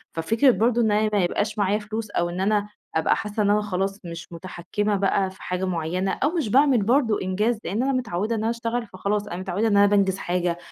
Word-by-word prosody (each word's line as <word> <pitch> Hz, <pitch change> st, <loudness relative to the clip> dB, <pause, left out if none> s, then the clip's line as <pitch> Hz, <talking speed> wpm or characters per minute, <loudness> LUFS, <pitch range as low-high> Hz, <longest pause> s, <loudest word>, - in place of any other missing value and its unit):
ففكرة 225 Hz, -, +3 dB
برضه 235 Hz, +1 st, +2 dB
إن 220 Hz, -2 st, +2 dB
أنا 215 Hz, +1 st, +2 dB
ما 200 Hz, -3 st, +3 dB
يبقاش 205 Hz, +5 st, -1 dB
معايا 205 Hz, 0 st, +1 dB
فلوس 215 Hz, +1 st, -5 dB
أو 175 Hz, -3 st, 0 dB
إن 175 Hz, +2 st, -4 dB
أنا 205 Hz, +1 st, +1 dB, 0.3 s
أبقى 160 Hz, -, +3 dB
حاسّة 210 Hz, 0 st, -2 dB
إن 200 Hz, -, +2 dB
أنا 210 Hz, +1 st, +3 dB
خلاص 195 Hz, 0 st, -2 dB
مش 170 Hz, 0 st, -8 dB
مُتحكّمة 185 Hz, +4 st, -3 dB
بقى 195 Hz, -1 st, +1 dB
في 190 Hz, -, -17 dB
حاجة 180 Hz, +1 st, -2 dB
معيّنة، 180 Hz, +2 st, -1 dB
أو 295 Hz, -, 0 dB
مش 310 Hz, -10 st, -1 dB
باعمل 260 Hz, -2 st, +4 dB
برضه 235 Hz, -1 st, +2 dB
إنجاز 210 Hz, +5 st, 0 dB
لإن 215 Hz, +7 st, -1 dB
أنا 275 Hz, -, +1 dB
متعوّدة 225 Hz, -3 st, -1 dB
إن 220 Hz, -, -2 dB
أنا 220 Hz, -, 0 dB
اشتغل 230 Hz, 0 st, -2 dB
فخلاص 205 Hz, +2 st, -2 dB
أنا 175 Hz, -, -5 dB
متعوّدة 190 Hz, +4 st, -1 dB
إن 205 Hz, -2 st, +3 dB
أنا 200 Hz, -, +7 dB
بانجز 200 Hz, -2 st, +2 dB
حاجة، 175 Hz, -2 st, -1 dB
205 Hz, 225 wpm, -24 LUFS, 185-220 Hz, 0.3 s, أنا